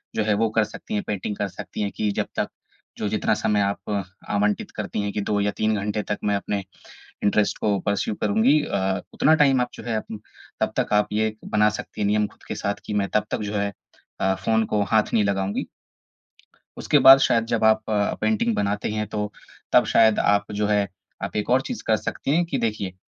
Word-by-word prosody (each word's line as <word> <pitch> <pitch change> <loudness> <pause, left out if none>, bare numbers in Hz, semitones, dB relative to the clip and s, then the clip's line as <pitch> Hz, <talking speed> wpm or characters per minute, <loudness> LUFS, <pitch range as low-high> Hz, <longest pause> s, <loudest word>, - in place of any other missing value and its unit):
जो 110 - +1
है 105 0 +2
वो 115 - +2
कर - - +5
सकती - - -8
हैं, 105 - 0
पेंटिंग 105 0 -3
कर 105 - -1
सकती 100 +2 -7
हैं 100 -1 -1
कि 105 -1 0
जब - - -3
तक - - 0 0.5
जो - - -2
जितना - - +1
समय 105 -1 +1
आप 100 +1 -2 0.4
आवंटित 105 0 0
करती - - -3
हैं 100 0 -2
कि 105 - -1
2-3 105 +1 0
घंटे 105 +1 -2
तक 105 - -3
मैं 105 -1 +1
अपने 100 0 -2 0.7
इंटरेस्ट 105 0 +2
को 105 -2 +1
पर्स्यु 100 +1 0
करूँगी। 110 +8 +3
अ, 95 0 -1
उतना 155 - +4
टाइम 135 -3 +4
आप 125 - 0
जो - - -9
है 115 -2 -1
अप 110 - -4 0.5
तब - - 0
तक - - 0
आप 105 0 +3
ये 110 0 0
बना 105 0 +3
सकती 105 - -7
हैं 105 - +2
नियम 105 0 +2
ख़ुद - - -20
के - - -3
साथ 100 0 -2
कि 105 - -3
मैं 100 - -2
तब 105 - +2
तक - - -2
जो - - -5
है 100 0 -1 0.5
अ, 95 0 +2
फ़ोन 110 +4 +1
को 105 -1 0
हाथ 110 -1 +3
नहीं 110 -3 +4
लगाऊँगी। 100 0 -1 1.1
उसके 145 - +3
बाद 135 0 +11
शायद 115 -4 +2
जब 115 -1 -1
आप 110 0 +3
अ, 105 -1 +1
पेंटिंग 230 +1 +1
बनाते 100 0 -1
हैं 105 0 -2
तो 105 0 -3 0.4
तब - - +5
शायद 110 -1 +5
आप 100 0 +3
जो 105 0 -1
है 105 -1 +2 0.4
आप - - -4
एक 105 +2 -2
और 130 +1 +4
चीज़ 240 - -6
कर 110 - +4
सकती 140 +7 -2
हैं 175 - +3
कि 155 -5 -2
देखिए, 110 -6 -2
105 Hz, 220 wpm, -24 LUFS, 100-110 Hz, 1.1 s, बाद